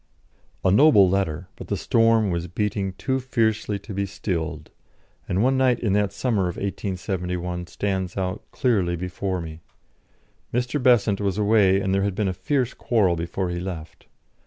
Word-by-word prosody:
D - - -39
." - - -23
A 95 - +5
noble 105 -3 +6
letter, 90 -3 -1
but - - -10
the - - -1
storm 115 -3 +3
was 85 0 -2
beating 100 +1 -2
too 130 +7 -1
fiercely 110 -5 0
to 100 +2 -9
be 100 +1 -1
stilled, 85 -5 -4 0.6
and 95 +4 +1
one 130 +1 +3
night 125 -2 +3
in 105 -5 0
that 105 -1 +2
summer 100 -3 0
of 85 - -4
1871 90 -3 -3
stands 95 -1 -3
out 95 +1 -2
clearly 100 -9 +1
before 90 +2 -3
me. 80 -1 -7 0.9
Mr. 125 +4 -1
Besant 110 -5 +3
was 100 -1 -1
away, 100 -2 +4
and 95 -1 -1
there 100 - +2
had 100 -1 -1
been 105 -1 0
a 95 - 0
fierce 125 +7 -1
quarrel 100 -7 +1
before 85 +2 -3
he 85 - -3
left. 85 -4 -7
95 Hz, 175 wpm, -24 LUFS, 90-110 Hz, 0.9 s, noble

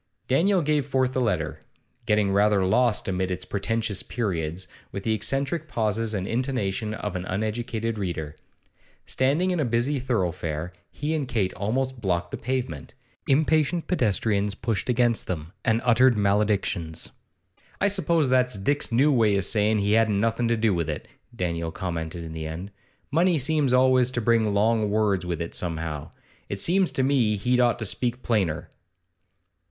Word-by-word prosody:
Daniel 180 +7 +3
gave 150 -1 +1
forth 130 -2 0
the 130 - 0
letter, 90 -10 -1 0.5
getting 105 -2 +2
rather 100 -1 +3
lost 115 +3 +2
amid 95 -1 -1
its 90 - -3
pretentious 105 0 -1
periods, 90 -6 -3 0.2
with 100 - -5
the 110 - +1
eccentric 135 - -1
pauses 110 -3 -1
and 95 -2 -2
intonation 115 -4 -1
of 105 -3 -4
an 90 - -3
uneducated 110 +2 -2
reader. 80 -6 -3 0.7
Standing 150 +8 +1
in 180 - -1
a - - +2
busy 120 +4 0
thoroughfare, 90 -9 -2 0.2
he 150 +2 -3
and 150 -4 -1
Kate 110 -7 0
almost 125 +6 -2
blocked 85 -3 -1
the - - -4
pavement; 120 - -4 0.3
impatient 155 +3 +2
pedestrians 105 - +1
pushed 115 +2 -2
against 120 -1 +2
them, 80 -2 -5
and 115 -1 +1
uttered 125 0 +5
maledictions. 100 -5 0 0.7
'I - - +3
suppose 170 -6 +1
that's 125 -3 +2
Dick's 140 +8 -1
new 140 +6 +4
way 110 -5 +3
o' - - +1
sayin' 105 +2 +2
he 100 0 +1
hadn't 110 -2 +3
nothin' 115 +2 +1
to 115 0 +1
do 110 -2 +2
with 85 -3 -1
it,' 75 - -4 0.3
Daniel 85 -4 -2
commented 85 -1 -4
at 80 - -7
the 80 -1 -5
end. 85 +6 -6 0.4
'Money 170 +3 +3
seems 150 -1 +1
always 130 0 +4
to 130 - -2
bring 115 -2 +2
long 110 +1 +2
words 100 -4 +1
with 85 -3 -2
it 85 - -4
somehow. 80 -4 -3 0.4
It 100 - -3
seems 185 - +2
to 135 - +1
me 130 -6 +2
he'd 125 +5 +1
ought 120 -1 +3
to 110 - -4
speak 125 +4 -2
plainer. 95 -9 0
110 Hz, 165 wpm, -25 LUFS, 95-130 Hz, 0.7 s, uttered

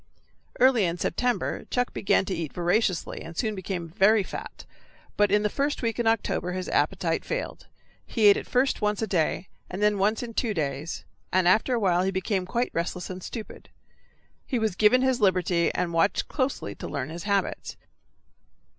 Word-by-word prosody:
Early 250 -5 +5
in 170 0 -1
September 245 +8 -1
Chuck 245 -1 -1
began 195 - +2
to 190 - -3
eat 165 -4 -4
voraciously 180 +1 0
and 165 0 -9
soon 220 -2 0
became 190 -3 -4
very 200 +4 +4
fat, - - -8 0.5
but 205 0 +3
in 210 0 +3
the - - +3
first 280 +5 -2
week 230 0 -1
in 235 - +1
October 205 -5 0
his 185 0 -4
appetite - - 0
failed; - - -5 0.4
he 225 -3 +1
ate 200 -1 +8
at - - -5
first 255 0 +1
once 210 +1 0
a - - +2
day, 180 -2 0 0.2
then 205 +2 +1
once 215 +4 +1
in 235 -1 -7
two 220 -2 -1
days, 145 0 -3 0.3
and 185 -1 +3
after 220 +7 +3
awhile 185 -6 +2
he 190 - +1
became 190 0 -1
quite 240 +5 -1
restless 180 +2 -3
and 185 0 -7
stupid. 220 +3 -8 0.7
He 255 - -2
was 220 -5 0
given 215 +6 +4
his 260 -1 +1
liberty, 180 -3 +2
and 175 -1 -1
watched 165 +5 +2
closely 260 - -2
to - - -7
learn 140 0 -4
his 170 +4 -7
habits. 200 -1 -1
200 Hz, 180 wpm, -26 LUFS, 180-225 Hz, 0.7 s, ate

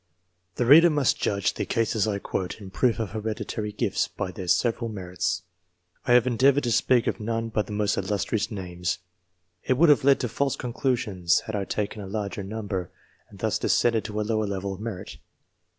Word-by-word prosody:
The 125 - 0
reader 155 +7 +8
himself 155 - 0
must 145 -4 +2
judge 100 -1 +1
the - - -3
cases 110 -2 +1 0.2
quoted 95 +3 -3
in 95 -2 -10
proof 120 +3 +2
of 110 -4 -3
hereditary 110 0 -4
gifts, 105 - 0
by 90 - -5
their 90 0 -7
several 115 +4 +1
merits. 90 -3 -3 0.6
I 120 - +5
have 125 -1 +6
endeavoured 130 +3 +3
to 120 - 0
speak 120 0 +3
of - - -1
none 115 +1 -2
but 105 -1 -1
the - - -8
most 105 0 0
illustrious 105 +2 -1
names. 90 -4 -3 0.7
It 130 - +1
would 165 +2 +5
have 145 - +5
led 140 0 +5
to 125 - 0
false 135 +4 -1
conclusions, 120 - 0
had 110 - -5
I 100 -1 -1
taken 105 +1 -3
a 100 - -7
larger 100 0 -3
number, 100 -3 -4 0.4
and - - -14
thus - - -1
descended 115 -2 +2
to 105 -1 -4
a - - +1
lower 110 0 0
level 100 0 -3
of 95 - -9
merit. 110 -4 -6
110 Hz, 195 wpm, -26 LUFS, 100-120 Hz, 0.7 s, reader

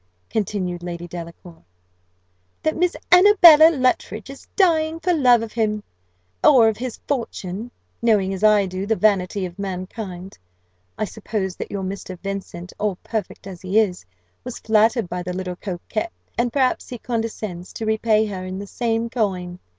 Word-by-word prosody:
continued 185 -4 -2
Lady 175 0 -6
Delacour: 170 0 -10 1.0
"that 315 - +1
Miss 360 0 +1 0.2
Annabella 355 -4 +9
Luttridge 255 - -1
is 275 - -13
dying 325 -4 +2
for 360 +1 +1
love 250 -7 +4
of 225 - -7
him 215 -2 0 0.6
or 255 -7 +7
of 220 - +1
his 250 -1 -5
fortune. 230 -5 -3 0.3
Knowing, 205 -5 +2
as 190 +2 -5
I 210 -2 +5
do, 185 +1 -4
the 220 - +2
vanity 200 -2 +1
of 180 +2 -9
mankind, 185 0 -6 0.6
I 215 - 0
suppose 205 -3 -4
that - - -5
your 200 -1 -4
Mr. 185 -1 -6
Vincent, 190 -2 -6
all 210 -3 0
perfect 215 -5 -4
as 185 -3 -9
he 190 +3 -1
is, 200 -5 +2 0.4
was 250 -1 -6
flattered 220 0 +2
by 180 +1 -4
the 180 0 -4
little 180 -1 -4
coquette; 205 - -4 0.2
and 240 0 0
perhaps 260 -1 0
he 245 - -5
condescends 220 -6 -4
to 225 - -5
repay 220 0 +2
her 190 -3 -5
in 185 0 -5
the 200 - -6
same 230 +2 -1
coin. 185 -7 -2
210 Hz, 160 wpm, -22 LUFS, 185-235 Hz, 1.0 s, Annabella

